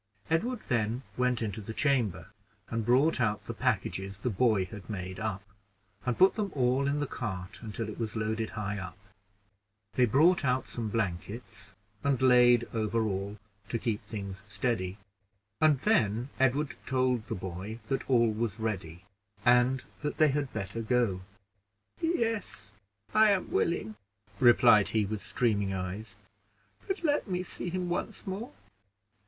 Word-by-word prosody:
Edward 230 +8 +1
then 120 +1 -1
went 125 -2 +1
into 110 0 -3
the 110 +2 -7
chamber, 110 - +1 0.4
and 115 -1 -1
brought 130 +3 +4
out 105 -3 0
the - - -4
packages 95 +1 -1
the 125 - 0
boy 105 -2 +3
had 105 +1 -10
made 95 -2 -5
up, 105 -2 -3 0.6
and 125 - +1
put 190 +1 +6
them 205 -3 -2
all 130 +1 +2
in 145 +1 0
the 145 - 0
cart 95 -9 -5
until 110 0 -4
it 110 - -7
was 115 -1 -3
loaded 110 0 -1
high 105 -1 -2
up; 90 -1 -7 1.0
they 125 - +4
brought 165 - +4
out 130 -1 +1
some 115 -3 -4
blankets, 100 +1 -3 0.3
and 140 -2 +2
laid 125 -2 +6
over 110 0 0
all 100 0 -2 0.3
to 115 - 0
keep 115 -2 -2
things 100 -3 -6
steady; 105 -4 -1 0.6
and 155 -2 +5
then 120 - +2
Edward 135 +2 +1
told 125 -3 +1
the - - -3
boy 95 +4 -6
that 135 0 -2
all 120 -3 +4
was 110 0 -2
ready, 90 -6 -3 0.4
and 125 +2 +4 0.2
that 150 0 -3
they 155 -1 +5
had 140 -1 -1
better 100 +2 -4
go. 115 -5 +1 0.8
"Yes, 225 - -1 0.4
I 215 0 +6
am 200 -2 +1
willing," 110 -10 0 0.4
replied 120 -4 +6
he, 110 -2 +1
with 105 +1 -4
streaming 100 -5 0
eyes; 95 +2 -5 0.7
"but 385 -2 -2
let 295 -5 +1
me 180 -1 -1
see 180 - -5
him 180 0 -2
once 175 - -3
more." 200 +5 -5
115 Hz, 150 wpm, -30 LUFS, 105-135 Hz, 1.0 s, put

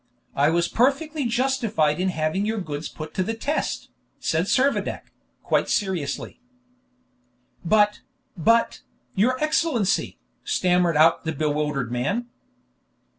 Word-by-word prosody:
I 145 +2 +3
was 170 +1 +2
perfectly 280 +3 +1
justified 230 - +1
in 185 +1 +1
having 160 +3 -1
your 220 +1 -1
goods 155 -4 -5
put 155 0 -8
to - - -1
the 225 +5 -2
test," 285 +7 -3 0.3
said 160 +2 0
Servadac, 270 +7 0 0.3
quite - - +1
seriously. 180 -3 -2 1.2
"But 210 +3 +3 0.3
but, 230 +7 +2 0.3
your 240 +6 +2
Excellency 305 - 0 0.2
" - - -44
stammered 180 -3 +2
out 165 +2 +5
the 160 - -2
bewildered 150 -4 -1
man. 145 - -1
185 Hz, 120 wpm, -24 LUFS, 155-235 Hz, 1.2 s, out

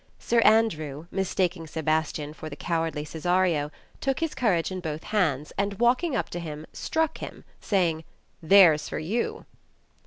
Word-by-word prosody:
Sir 235 - +1
Andrew, 165 -10 +2
mistaking 185 -3 -1
Sebastian 155 -1 -1
for 155 0 -8
the 145 - -7
cowardly 165 -2 -2
Cesario, 165 -1 +1 0.3
took 270 -1 -1
his 325 -1 -1
courage 200 -10 +1
in 185 - -3
both 155 -3 -5
hands, 155 -9 0
and 200 0 -1
walking 255 +6 +2
up - - -1
to 175 - -4
him 155 -2 -6
struck 320 -1 -1
him, - - -8 0.2
saying, 170 -5 0 0.4
'^There's 165 -3 +6
for - - -4
you." 195 +10 -2
170 Hz, 150 wpm, -26 LUFS, 155-205 Hz, 0.4 s, ^There's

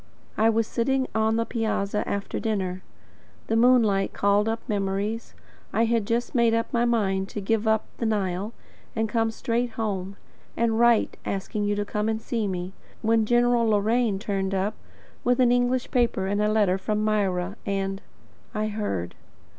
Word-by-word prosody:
I 220 +1 +4
was 225 0 +2
sitting 260 +4 0
on 220 0 +2
the 230 0 +1
piazza 215 -3 -1
after 200 0 -3
dinner. 190 -5 -2 0.6
The 225 - 0
moonlight 225 -5 +4
called 200 +2 +2
up 225 0 -2
memories. 205 +1 -2 0.4
I 230 - +2
had 225 -3 +1
just 235 +1 -1
made 235 -3 +3
up 230 - +1
my 240 0 +2
mind 195 -5 +1
to - - -5
give 220 +2 0
up 220 0 +2
the 230 - 0
Nile, 200 -1 -1 0.4
and 220 0 0
to - - -12
come 225 -1 +2
straight 235 +1 -2
home, 200 -4 -3 0.4
and 230 -1 +1
write 235 -1 +3
asking 205 +2 -2
you 205 0 +1
to 205 0 -1
come 210 +1 -1
and 220 0 -1
see 225 -1 -2
me; 180 0 -4 0.3
when 225 -1 +3
General 240 0 +3
Loraine 220 0 +2
turned 195 -2 -2
up, 195 +3 0 0.5
with 245 +1 +2
an 245 -1 +5
English 245 0 +1
paper 235 -7 +1
and 205 +2 0
a 210 - +2
letter 200 -3 +2
from 210 +2 -1
Myra, 200 -3 0
and 195 0 -2 0.5
I 215 0 0
heard. 150 - -3
215 Hz, 170 wpm, -25 LUFS, 200-230 Hz, 0.6 s, an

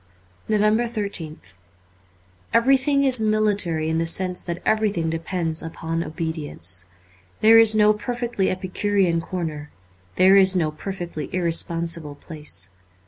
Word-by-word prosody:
352 220 +2 +1
NOVEMBER 175 -7 -3
13th 90 - -18 1.0
EVERYTHING 270 +4 +3
is 255 -4 +4
military 205 -7 0
in 160 0 0
the 165 - 0
sense 180 +1 +1
that 170 0 -5
everything 205 -7 +1
depends 165 -1 -2
upon 165 0 -4
obedience. 150 - -5 0.6
There 225 +1 +7
is 220 -1 +5
no 210 0 +5
perfectly 240 -2 -2
epicurean 185 -1 0
corner; 160 -4 -5 0.5
there 190 +2 +6
is 190 -1 +5
no 160 -4 +1
perfectly 175 -2 -6
irresponsible 165 -3 -2
place. 150 - -6
180 Hz, 120 wpm, -22 LUFS, 160-215 Hz, 1.0 s, There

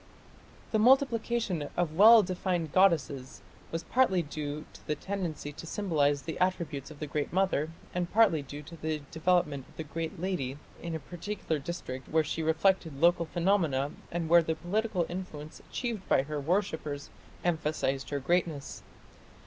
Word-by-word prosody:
The 220 - +2
multiplication 230 - +3
of 175 -3 +1
well 215 +5 +9
defined 180 -3 -1
goddesses 155 -8 +2 0.3
was 165 0 -3
partly 190 -8 +3
due 150 0 -5
to - - -16
the 150 - 0
tendency 170 -5 -4
to 165 - -9
symbolize 150 -8 +1
the 160 - -5
attributes 170 -7 -1
of 155 - -11
the 150 - -4
Great 150 0 -2
Mother, 185 -5 +1 0.2
and 175 -1 -2
partly 200 -8 +4
due 145 +2 -8
to 170 +3 -10
the 155 -2 -3
development 160 -5 +1
of - - -21
the 160 - -3
great 160 +1 -5
"Lady" 150 -8 -2 0.2
in 170 -1 -4
a - - -3
particular 175 +1 -4
district 135 -4 -6
where 160 0 +3
she 160 +2 -3
reflected 160 -2 +2
local 170 0 +4
phenomena 165 -6 +1 0.2
and 170 -1 -2
where 170 +1 +7
the 160 0 -1
political 180 +2 -1
influence 155 -4 -7
achieved 230 -6 -5
by 135 - +4
her 150 +1 -4
worshippers 155 -3 -1 0.3
emphasized 150 -5 0
her 145 - -1
greatness. 160 -1 -1
165 Hz, 155 wpm, -30 LUFS, 150-185 Hz, 0.3 s, well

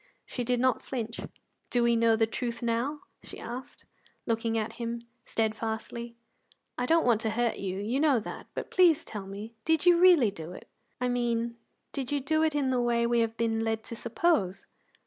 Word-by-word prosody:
She 245 - -4
did 245 0 +1
not 255 -2 +2
flinch. 235 -3 -4 0.5
"Do 245 -1 +2
we 235 0 +4
know 230 -1 +4
the 225 0 +3
truth 235 +1 -4
now?" 235 +6 -1 0.2
she - - -10
asked, 245 +3 -8 0.4
looking 230 0 0
at 220 0 -2
him 235 0 -3 0.2
steadfastly. 225 +1 -2 0.6
"I 245 - -1
don't 330 0 +4
want 230 -3 +3
to 220 - 0
hurt 235 +1 0
you 190 -1 -3
you 220 +7 -1
know 290 -5 +4
that; 215 - -8
but - - -5
please 335 -4 +5
tell 205 -3 -6
me, 205 +4 -7
did 320 +1 +2
you 350 -1 +6
really 345 - +6
do 165 -2 -8
it? - - -11 0.3
I 250 - 0
mean, 235 -1 0 0.4
did 270 -2 -4
you 290 - +1
do 310 +4 +1
it 315 -2 +2
in 275 -3 +1
the 250 -1 +2
way 235 -1 +2
we 235 0 +2
have 225 0 0
been 225 -1 +1
led 225 0 -1
to 230 - -7
suppose?" 225 - 0
235 Hz, 195 wpm, -29 LUFS, 225-260 Hz, 0.6 s, you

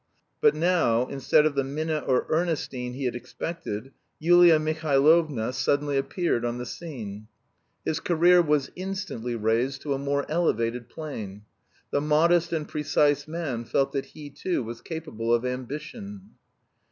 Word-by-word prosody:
But 445 -1 +5
now, 160 -10 +2
instead 150 +3 +3
of 155 - +2
the 140 -1 +1
Minna 155 +3 -2
or 130 -3 +1
Ernestine 155 -7 -1
he 135 +1 -4
had 125 - 0
expected, 125 -1 -5 0.3
Yulia 175 0 +6
Mihailovna 155 -4 +2
suddenly 140 +3 0
appeared 135 -1 0
on 120 0 -2
the 125 - -5
scene. 110 -11 -7 0.6
His 155 - 0
career 175 +1 +5
was 150 -4 +1
instantly 185 - -4
raised 115 +4 0
to 145 - -1
a 135 - -2
more 140 0 -1
elevated 120 -7 0
plane. 105 -11 -7 0.5
The 145 - +1
modest 165 +3 +3
and 155 -2 -2
precise 145 -1 +1
man 155 -8 -3
felt 135 +3 0
that 135 -1 -2
he 145 -2 -9
too 175 0 -2
was 115 +1 -7
capable 155 -9 -4
of 120 +1 +2
ambition. 155 - -6
145 Hz, 145 wpm, -26 LUFS, 125-165 Hz, 0.6 s, Yulia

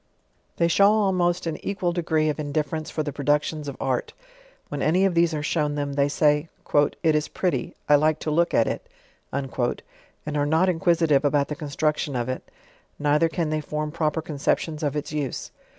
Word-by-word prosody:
They 170 - +3
show 200 +4 +5
almost 185 -5 +1
an 165 -2 -4
equal 185 -3 -1
degree 160 -3 +1
of 150 - -3
indifference 150 +1 -2
for 155 - -2
th& 145 -2 -4
productions 145 +1 0
of 140 - -5
art. 130 -2 -1 0.5
When 145 -1 -4
any 180 +5 +3
of 190 - +2
these 170 0 +3
are 150 -2 -3
eliown 150 -1 0
them, 145 -1 -2
they 140 0 +2
say, 150 +2 +2 0.5
"It 160 -2 +4
is 150 0 +1
pretty, 180 -2 -2
I 150 - +6
like 155 +1 +2
to 155 - -2
look 170 +3 +2
at - - +3
it/' - - -2 0.5
and 135 +2 -4
are 145 - +2
not 160 +5 +3
inquisitive 165 -4 +3
about 145 -1 +2
the 150 - -3
construction 150 -1 -1
of 120 0 -1
it, 130 - -3 0.6
neither 150 +3 +2
can 160 -1 -2
thej 155 0 -1
form 150 +1 -3
proper 160 0 -1
conceptions 155 +1 -1
of 145 -2 -1
its 150 -1 -3
use. 145 -4 -3
150 Hz, 185 wpm, -24 LUFS, 145-165 Hz, 0.6 s, I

